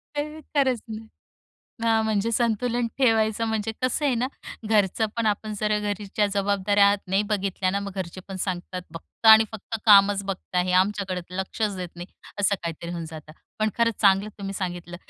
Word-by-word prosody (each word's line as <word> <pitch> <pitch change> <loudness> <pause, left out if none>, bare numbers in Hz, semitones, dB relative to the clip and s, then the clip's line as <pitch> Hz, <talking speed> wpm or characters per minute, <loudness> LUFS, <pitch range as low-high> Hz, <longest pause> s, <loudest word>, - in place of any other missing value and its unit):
अ, 290 - +1 0.3
खरंच 260 -4 +2
ना. 220 0 -7 0.8
हां. 225 -1 +3
म्हणजे 220 +1 0
संतुलन 235 +1 0
ठेवायचं 225 -3 +2
म्हणजे 220 0 -2
कसं 255 +4 0
आहे 270 -4 +2
ना. 245 +2 0 0.4
घरचं 215 0 +2
पण 230 -1 0
आपण 215 +1 -1
जर 210 0 +1
घरच्या 205 0 -1
जबाबदाऱ्या 200 0 +3
नाही 195 +2 +1
बघितल्या 190 -2 0
ना, 200 +1 -1
मग 200 -1 -6
घरचे 185 0 -5
पण 190 - -6
सांगतात, 180 0 -4
"फक्त 195 +6 -7
आणि 220 0 +9
फक्त 220 +1 -5
कामच 200 -1 +6
बघता 185 -2 -3
आहे. 180 0 +1
आमच्याकडे 195 -2 -3 0.2
लक्षच 200 +1 -2
देत 180 -1 -5
नाही." 175 +1 -7 0.3
असं 200 0 +3
काहीतरी 170 0 -5
होऊन 170 -1 -4
जातं. 155 -1 -10 0.3
पण 215 0 +2
खरंच 230 -2 +1
चांगलं 200 0 +4
तुम्ही 195 0 -5
सांगितलं, 175 -2 -5
205 Hz, 170 wpm, -25 LUFS, 190-220 Hz, 0.8 s, आणि